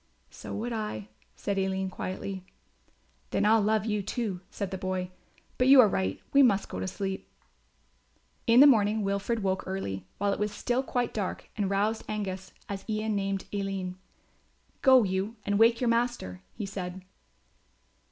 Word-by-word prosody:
"So - - -9
would 235 +3 -3
I," 160 - -4 0.3
said 200 -1 -2
Aline 190 0 -1
quietly. 190 0 -5 0.9
"Then - - +1
I'll 220 +1 +5
love 215 0 +2
you, 210 -2 0
too," 200 -3 -3
said 200 -2 -4
the 190 - -3
boy; 185 -1 -2 0.5
"but 250 - +4
you 270 0 +9
are 235 - +9
right, 95 - -1
we 280 - +7
must 205 -7 +3
go 90 - -5
to 95 - -2
sleep." 190 - -4 1.2
In 235 +2 +7
the - - +10
morning 215 -5 +4
Wilfred 200 +3 -1
woke 190 0 0
early, 95 - -4
while 200 0 +1
it - - -4
was 210 0 0
still 245 +4 0
quite 245 -2 -1
dark 200 -4 -4
and 205 -3 0
roused 205 +3 0
Angus, 190 -3 -4 0.2
as 195 -1 -5
Ian 215 0 0
named 195 -1 -1
Aline. 195 -2 -2 0.9
"Go 260 -3 +7
you 190 +3 -1
and 205 0 +1
wake 230 +1 +5
your 250 - 0
master," 230 - 0
he 210 - -4
said. 185 -1 -6
200 Hz, 165 wpm, -29 LUFS, 190-220 Hz, 1.2 s, the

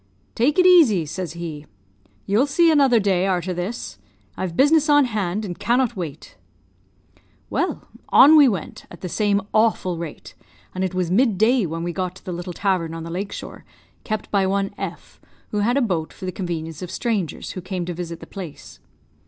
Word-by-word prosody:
"'Take 275 +8 +1
it 365 - +5
easy,' 290 - +6
says 175 +2 -5
he; 160 -3 -7 0.6
'you'll 220 +8 +2
see 330 +4 +4
another 275 -6 +4
day 195 -2 +1
arter 185 -1 -1
this 180 +7 -5 0.4
I've 180 -3 -4
business 305 +2 +4
on 290 -1 +6
hand, 210 -3 -2
and 175 -3 -6
cannot 240 0 +1
wait.' 165 -6 -7 1.1
"Well, - - -2 0.2
on 295 +4 +8
we 295 -3 +8
went, 190 -8 -5
at 175 - -13
the 185 - -4
same 200 +1 +1
awful 215 -6 +1
rate, 165 -3 -8 0.4
and 185 - -2
it 185 -1 -2
was 180 -2 -1
mid 220 0 +3
day 220 0 +3
when 165 +1 -4
we 175 0 -3
got 185 -1 -3
to - - -16
the 180 - -4
little 175 +1 -5
tavern 175 -4 -1
on 165 - -6
the 165 - -7
lake 195 +4 -4
shore, - - -8 0.4
kept 215 -1 -4
by 195 -2 +2
one 195 0 -1
F, - - -8 0.3
who 210 - -2
had 235 +6 +2
a 280 - +3
boat 170 -8 -2
for - - -9
the 185 - -2
convenience 165 -4 -5
of 180 - -6
strangers 210 -8 -2
who 185 - -6
came 185 -1 -4
to 175 - -4
visit 170 -1 -6
the - - -8
place. 145 - -10
190 Hz, 195 wpm, -22 LUFS, 175-230 Hz, 1.1 s, on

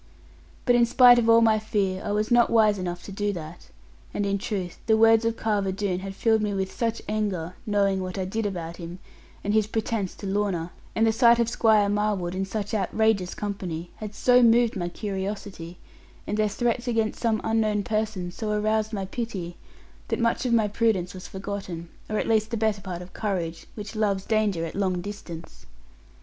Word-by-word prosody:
But 245 - +4
in 240 -1 +4
spite 245 0 +7
of 230 -1 +1
all 230 0 +7
my 220 -1 +4
fear, 200 -3 -1
I - - -2
was 210 +3 0
not 240 -1 +5
wise 215 -3 +4
enough 175 -1 -4
to - - -9
do 205 +1 -1
that. 165 -1 -8 0.5
And 205 - 0
in 200 0 0
truth 190 -3 -4
the 220 -1 +4
words 225 0 +5
of 230 0 0
Carver 205 -3 0
Doone 190 -2 -2
had 195 0 -7
filled 220 0 +2
me 210 -1 -1
with 190 -1 -2
such 230 -1 -2
anger, 200 -6 -2
knowing 200 -2 +2
what 185 0 -5
I 190 - -1
did 215 +3 -2
about 170 -3 -5
him 170 0 -7 0.5
and 205 - 0
his 215 -1 +3
pretence 215 -3 -2
to - - -9
Lorna; 190 -4 -1 0.2
and 225 - +3
the 225 - +4
sight 235 +1 +5
of 235 -1 +2
Squire 220 -3 +4
Marwood, 205 -4 0
in 190 +1 -1
such 205 +2 -4
outrageous 210 -2 +1
company, 180 -5 -4
had 210 -1 -7
so 250 +2 +5
moved 235 0 +4
my 175 -3 -2
curiosity, 195 -3 -5 0.5
and 210 - -2
their 215 0 +2
threats 240 +3 -1
against 225 -2 0
some 225 -2 +1
unknown 215 -2 +1
person 215 -4 -2
so 215 +4 -5
aroused 215 +1 0
my 195 -2 -2
pity, 190 -5 -5 0.5
that - - -1
much 235 +2 +1
of - - 0
my 220 -2 +4
prudence 205 -4 0
was 185 -1 -9
forgotten, 190 -4 -6 0.2
or 215 - -1
at - - -1
least 220 -1 +2
the 230 - -2
better 215 -2 0
part 180 -2 -6
of 180 - -14
courage, 175 -6 -3
which 215 +1 -7
loves 200 -3 0
danger 210 -6 +1
at 165 - -6
long 190 -2 0
distance. 175 -4 -9
205 Hz, 200 wpm, -26 LUFS, 190-220 Hz, 0.5 s, spite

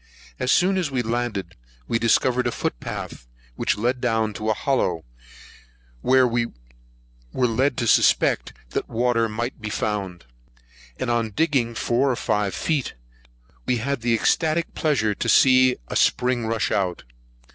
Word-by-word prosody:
As 130 0 +1
soon 190 +1 +3
as 170 -5 -1
we 130 -3 -1
landed, 115 -6 -3 0.3
we 115 - 0
discovered 125 +2 +2
a - - 0
foot - - -3
path - - -7 0.3
which - - 0
led 125 +4 -1
down 115 -3 +1
into 110 +1 -4
a 110 - +2
hollow, 95 - -1 1.0
where 130 0 +4
we 120 0 0 0.8
were 125 - 0
led 125 +3 +1
to 120 - -1
suspect - - +3 0.2
that - - -3
water 115 -1 +1
might 120 +3 -4
be 110 - -4
found; 100 - -3 0.7
and 125 - -2
on 115 -1 0
digging 125 -1 0
four 125 +5 +1
or 125 - +1
five 105 -3 -1
feet, 150 -5 -2 0.7
we 125 - +2
had 135 +2 -2
the 115 0 +2
ecstatic 160 +8 +1
pleasure 130 -9 +1
to 115 - -3
see 130 +1 +5
a - - -6
spring 125 -2 +1
rush 115 -1 -1
out. 95 -3 -1
120 Hz, 155 wpm, -23 LUFS, 110-130 Hz, 1.0 s, see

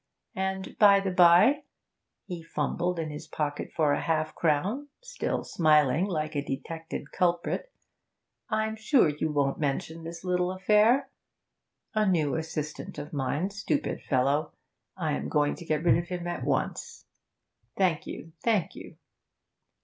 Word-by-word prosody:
And, 190 0 -3
by 200 -2 +7
the 195 -1 -2
bye' 180 - +6 0.6
he 175 -3 -6
fumbled 175 +2 -2
in 160 -2 -3
his 150 +1 -8
pocket 150 -1 -3
for 150 -3 +3
half 155 0 0
a - - -30
crown, 185 - 0 0.2
still - - -3
smiling 155 0 +3
like 155 -5 -2
a 140 - 0
detected 150 +2 -6
culprit 175 - 0 0.8
'I'm 220 0 0
sure 220 - +4
you 150 +1 -2
won't 140 -2 0
mention 155 +3 -2
this 170 +1 -8
little 180 0 0
affair. 210 +7 +3 0.8
A 215 -1 +2
new 155 -7 +2
assistant 155 -1 -4
of 145 +1 -7
mine 145 +7 -1
stupid 205 +9 -2
fellow 140 +3 +1 0.4
I - - -1
am 70 +1 -2
going 145 0 +2
to 170 - -10
get 155 -1 0
rid 170 - +4
of 175 - -5
him 175 -1 -4
at 175 -7 -3
once. 135 0 -2 0.7
Thank 175 -5 +1
you, 165 - -8
thank 205 -6 +1
you.' - - -11
165 Hz, 145 wpm, -28 LUFS, 150-190 Hz, 0.8 s, by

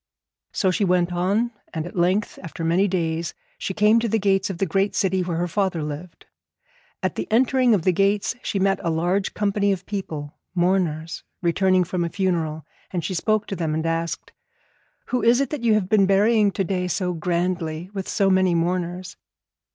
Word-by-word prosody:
So 190 - +1
she 190 - 0
went 180 -1 +2
on, 200 +7 +1 0.2
and 160 0 -2
at 175 - -9
length, 185 +4 +1
after 165 -1 -7
many 175 +5 +3
days, 165 -3 -2 0.2
she 190 - -3
came 215 +2 +5
to 230 0 -1
the 225 - +2
gates 195 -2 +1
of 190 - -4
the 195 - +1
great 195 +4 0
city 190 -1 +1
where 175 -2 -2
her 175 +1 0
father 185 -3 -1
lived. 150 +4 -7 0.8
At - - 0
the - - -4
entering 250 0 +4
of 180 - -1
the 185 - +4
gates 200 +5 +1
she 205 - -2
met 195 0 +2
a 170 - -1
large 175 +4 0
company 200 -1 +1
of 190 -1 -3
people, 155 -8 -5 0.2
mourners, 175 -3 0 0.2
returning 185 +2 +3
from 175 0 -2
a 170 - -1
funeral, 165 -5 -1 0.2
and 175 -3 -3
she 190 - -2
spoke 215 +4 +1
to 195 - -4
them 160 -3 -1
and 160 +1 -2
asked 165 0 -2
them: - - -44 0.7
'Who 250 - 0
is 235 +2 +4
it 275 - -1
that 300 - -3
you 230 -2 +3
have 205 -4 0
been 200 -2 +4
burying 205 +1 +4
to 195 - 0
day 180 -1 -1
so 180 +1 -1
grandly 170 0 -2
with 195 -2 -5
so 195 -2 +2
many 185 -2 +3
mourners?' 180 +1 -2
185 Hz, 195 wpm, -23 LUFS, 170-200 Hz, 0.8 s, came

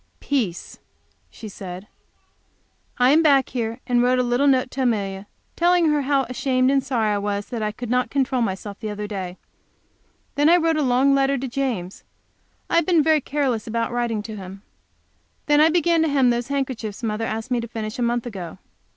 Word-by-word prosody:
"Peace," 225 -12 -3 0.5
she 220 - -10
said. 185 -1 -8 1.1
I 250 +1 +4
came 310 +3 +5
back 280 -5 +4
here 230 0 -3
and 245 -1 +2
wrote 250 +1 +3
a 250 - +2
little 245 +3 +1
note 260 -2 +2
to 270 - -4
Amelia, 200 -5 -1 0.3
telling 345 -1 +3
her 295 -1 +1
how 275 0 +1
ashamed 255 0 0
and 275 -1 +2
sorry 230 -5 0
I 205 - 0
was 205 0 -3
that 235 -3 -4
I 210 0 -1
could 240 +2 -7
not 250 0 +1
control 265 -2 0
myself 200 -1 -3
the 220 - -5
other 210 0 -5
day. 190 -3 -5 1.0
Then 290 +2 +3
I 345 - +6
wrote 330 -1 +1
a - - +1
long 265 +1 +3
letter 275 0 +2
to 265 +1 -4
James. 235 -8 -3 0.6
I - - +1
have 335 - +3
been 340 -4 +4
very 310 -1 +3
careless 265 -6 -1
about 230 +1 -2
writing 235 -3 -1
to 220 0 -7
him. 195 +1 -10 0.8
Then 295 0 +4
I 315 - +6
began 335 0 +2
to 320 - +2
hem 270 -4 +3
those 240 0 -2
handkerchiefs 255 -5 -3
mother 220 0 -2
asked 225 +3 -4
me 245 - +2
to 230 - -6
finish 220 0 -6
a - - -1
month 240 0 0
ago. 190 -7 -7
245 Hz, 200 wpm, -22 LUFS, 215-275 Hz, 1.1 s, I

